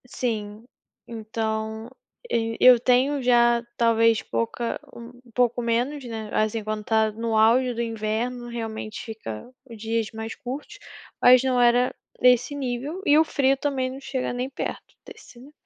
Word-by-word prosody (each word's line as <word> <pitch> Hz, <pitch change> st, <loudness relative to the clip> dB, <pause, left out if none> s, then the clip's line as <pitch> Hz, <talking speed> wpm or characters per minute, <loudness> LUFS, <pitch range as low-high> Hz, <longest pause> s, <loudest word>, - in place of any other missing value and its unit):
Sim, 220 Hz, -3 st, -4 dB, 0.4 s
então 220 Hz, 0 st, -4 dB, 0.4 s
eu 225 Hz, -, -1 dB
eu 250 Hz, -1 st, +8 dB
tenho, 255 Hz, +4 st, +2 dB
já, 240 Hz, -1 st, +4 dB
talvez 230 Hz, -1 st, +3 dB
pouca 115 Hz, -, -3 dB, 0.2 s
um 235 Hz, 0 st, -10 dB, 0.2 s
pouco 245 Hz, 0 st, +1 dB
menos, 245 Hz, +5 st, -1 dB
né, 220 Hz, -2 st, -6 dB
assim, 215 Hz, 0 st, 0 dB
quando 215 Hz, 0 st, -3 dB
está 220 Hz, 0 st, +1 dB
no 225 Hz, +1 st, -3 dB
auge 245 Hz, +3 st, +4 dB
do 235 Hz, -, -3 dB
inverno, 230 Hz, +2 st, -3 dB
realmente 225 Hz, -2 st, -6 dB
fica 220 Hz, -, -8 dB, 0.2 s
dias 225 Hz, 0 st, -3 dB
mais 220 Hz, 0 st, -6 dB
curtos, 260 Hz, +4 st, -7 dB, 0.4 s
mas, 250 Hz, 0 st, +7 dB
não 255 Hz, -2 st, +1 dB
era 245 Hz, +1 st, +3 dB, 0.3 s
desse 250 Hz, +3 st, +3 dB
nível, 275 Hz, +6 st, -4 dB
e 290 Hz, -, +5 dB
o 315 Hz, -, +6 dB
frio 275 Hz, -3 st, +1 dB
também, 265 Hz, -2 st, -1 dB
não 265 Hz, -, -8 dB
chega 260 Hz, -2 st, -3 dB
nem 250 Hz, +2 st, -3 dB
perto 270 Hz, -, -6 dB
desse, 240 Hz, -, -14 dB
né. 270 Hz, +4 st, -14 dB
235 Hz, 150 wpm, -24 LUFS, 220-250 Hz, 0.4 s, eu